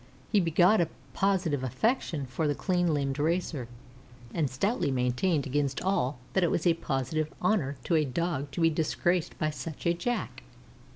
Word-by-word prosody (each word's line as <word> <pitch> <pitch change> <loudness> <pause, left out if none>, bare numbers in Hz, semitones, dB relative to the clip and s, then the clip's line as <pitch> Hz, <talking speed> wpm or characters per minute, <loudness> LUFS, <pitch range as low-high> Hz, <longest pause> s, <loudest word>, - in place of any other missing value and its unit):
He 210 - +5
begot 175 +4 +4
a 170 - 0 0.2
positive 185 -8 +1
affection 160 - 0
for 130 +5 -2
the 145 - +1
clean 180 -1 +1
limbed 140 -2 -1
racer, 160 -5 0 0.7
and 150 -4 +1
stoutly 195 - 0
maintained 130 +5 +1
against 140 0 0
all 145 -8 0 0.2
that 190 - +3
it 170 - +3
was 170 - -1
a 170 - +5
positive 150 0 -2
honor 155 -11 +1
to - - -1
a 155 - +4
Dog 145 +1 -2
to 170 - -2
be 165 0 +5
disgraced 170 +2 0
by 155 -1 0
such 155 0 -7
a 170 - +4
Jack. 240 +8 -3
160 Hz, 170 wpm, -29 LUFS, 140-180 Hz, 0.7 s, He